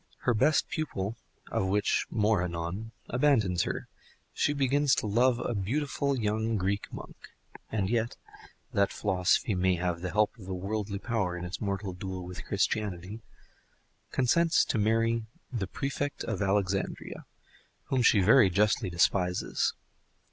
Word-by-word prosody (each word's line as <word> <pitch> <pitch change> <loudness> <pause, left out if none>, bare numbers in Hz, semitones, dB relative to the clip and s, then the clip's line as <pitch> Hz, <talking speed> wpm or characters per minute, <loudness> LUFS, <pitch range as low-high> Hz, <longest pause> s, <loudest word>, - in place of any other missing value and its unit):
Her 120 - +2
best 140 +7 +3
pupil 115 -9 -3 0.4
(of 95 - 0
whom 100 +2 +2 0.3
more 105 -3 +2
anon) 85 +5 -4 0.2
abandons 115 - +2
her, - - -4 0.5
she - - +1
begins 140 0 +2
to - - -2
love 120 +4 +3
a 120 - -2
beautiful 140 +6 -1
young 110 0 0
Greek 100 +2 -1
monk, - - -8 0.6
and 105 -4 0
yet 115 +2 -1 0.6
(that 100 0 +2
philosophy 95 +1 +1
may 95 0 +2
have 90 -1 -2
the 90 - -3
help 105 +2 +2
of 95 - -11
worldly 100 +2 -3
power 100 -5 -1
in 90 - -5
its 90 - -6
mortal 100 -2 -2
duel 90 0 -6
with 90 +1 -7
Christianity) 100 0 -1 0.9
consents 165 +6 +3
to 115 - -1
marry 115 +2 +2 0.3
the 105 -6 -2
Prefect 140 +1 -3
of 110 -4 -3
Alexandria, 95 -1 -1 0.6
whom 130 -2 +2
she 110 -3 +5
very 105 +2 +6
justly 105 +1 +2
despises. 90 +1 +1
105 Hz, 140 wpm, -29 LUFS, 95-115 Hz, 0.9 s, very